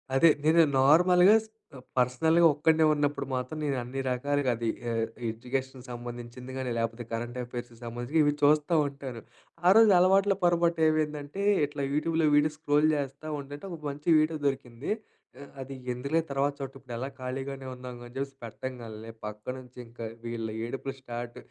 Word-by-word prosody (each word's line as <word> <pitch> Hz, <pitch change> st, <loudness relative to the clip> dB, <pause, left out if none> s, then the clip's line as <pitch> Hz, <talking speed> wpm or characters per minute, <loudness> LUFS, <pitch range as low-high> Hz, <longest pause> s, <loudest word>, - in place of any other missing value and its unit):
అదే 165 Hz, +4 st, +7 dB
నేను 165 Hz, +2 st, +6 dB, 0.2 s
నార్మల్‌గా, 180 Hz, +8 st, +6 dB
స్ -, -, -18 dB, 0.5 s
పర్సనల్‌గా 160 Hz, +7 st, +3 dB
ఒక్కడినే 160 Hz, +2 st, +3 dB
ఉన్నప్పుడు 145 Hz, -1 st, 0 dB
మాత్రం 130 Hz, +5 st, -3 dB
నేను 140 Hz, -3 st, 0 dB
అన్ని 135 Hz, +3 st, -4 dB
రకాలుగా 140 Hz, +1 st, 0 dB
అది 115 Hz, 0 st, -2 dB, 0.2 s
ఆహ్, 115 Hz, 0 st, 0 dB, 0.3 s
ఎడ్యుకేషన్‌కి 130 Hz, +3 st, -4 dB
సంబంధించింది 120 Hz, +1 st, -8 dB
గానీ, 130 Hz, -2 st, -2 dB
లేపోతే 115 Hz, +1 st, -2 dB
కరెంట్ 120 Hz, +2 st, -4 dB
అఫెయిర్స్‌కి 120 Hz, -1 st, -8 dB
సంబంధించి 120 Hz, +6 st, -2 dB
ఇవి 145 Hz, 0 st, +3 dB
చూస్తా 150 Hz, +3 st, +4 dB
ఉంటాను. 135 Hz, -4 st, -7 dB, 0.5 s
ఆరోజు 220 Hz, +2 st, +7 dB
అలవాట్లో 195 Hz, +1 st, +4 dB
పొరపాటు 170 Hz, -1 st, +2 dB
ఏవైందంటే, 150 Hz, +2 st, -2 dB, 0.2 s
ఇట్లా 145 Hz, -1 st, -5 dB
యూట్యూబ్‌లో 160 Hz, +1 st, +1 dB
వీడియో 150 Hz, +1 st, +3 dB
స్క్రోల్ 150 Hz, 0 st, +3 dB
చేస్తా 140 Hz, +1 st, -4 dB
ఉంటంటే 145 Hz, +5 st, -9 dB
ఒక 160 Hz, -, -8 dB
మంచి 145 Hz, +4 st, -5 dB
వీడియో 155 Hz, +1 st, +1 dB
దొరికింది. 130 Hz, -, -3 dB, 0.5 s
ఆహ్, 140 Hz, -, -11 dB
అది 135 Hz, +1 st, -7 dB, 0.2 s
ఎందుకులే 140 Hz, +6 st, 0 dB
తర్వాత 140 Hz, +1 st, +1 dB
చూటం 135 Hz, -1 st, -6 dB
ఇప్పుడు 125 Hz, -2 st, -10 dB
ఎలాగో 130 Hz, +3 st, -5 dB
ఖాళీగానే 135 Hz, +1 st, -5 dB
ఉన్నాంగా 125 Hz, -1 st, -9 dB
అని 120 Hz, -, -15 dB
చెప్పేసి 135 Hz, 0 st, -4 dB
పెట్టంగాల్నే, 115 Hz, -2 st, -7 dB, 0.2 s
పక్క 105 Hz, 0 st, -7 dB, 0.2 s
నుంచి 125 Hz, 0 st, -16 dB
ఇంకా 115 Hz, 0 st, -10 dB, 0.2 s
వీళ్ళ 115 Hz, -1 st, -4 dB, 0.2 s
ఏడుపులు 135 Hz, +2 st, -5 dB
స్టార్ట్. 120 Hz, -1 st, -6 dB
135 Hz, 155 wpm, -28 LUFS, 120-155 Hz, 0.5 s, అదే